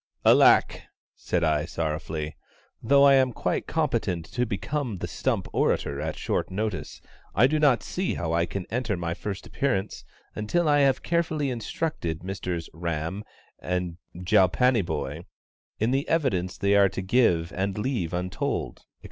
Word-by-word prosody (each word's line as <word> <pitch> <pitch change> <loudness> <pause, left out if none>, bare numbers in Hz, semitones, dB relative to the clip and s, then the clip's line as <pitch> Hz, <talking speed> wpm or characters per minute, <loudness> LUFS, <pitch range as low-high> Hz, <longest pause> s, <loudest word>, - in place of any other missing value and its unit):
"Alack," - - +5 0.3
said 90 -1 -1
I, 75 -2 +2
sorrowfully; 80 -1 -3 0.5
"though 140 +4 +5
I 140 -1 +7
am 130 -1 +4
quite - - -2
competent 115 - -1
to 125 0 0
become 120 +2 -3
the - - -4
stump - - -1
orator 70 0 0
at 80 0 -3
shortest - - -1
notice, 105 -1 -4 0.3
I 110 - +6
do 155 +4 +2
not 140 -6 +4
see 185 +1 -2
how 85 -1 -2
I 85 +1 +2
can 95 -1 -5
enter 115 -4 -1
my 85 -1 -2
first 100 +2 -6
appearance 125 -8 -2 0.3
until 155 +11 0
I 145 -1 +4
have 135 -1 +3
carefully 160 -4 0
instructed 115 - -3
Misters 90 -3 -4
RAM 85 +4 -3 0.4
and 90 -2 -3 0.2
JALPANYBHOY 90 - +2 0.6
in 110 +3 +1
the 135 +2 0
evidence 100 - 0
they 100 0 +2
are 100 -1 +5
to 95 - -4
give 95 -6 +2
and 95 +1 -2
leave 105 -7 -1
untold, 90 +1 -3
&c. - - -29
100 Hz, 150 wpm, -26 LUFS, 85-130 Hz, 0.6 s, I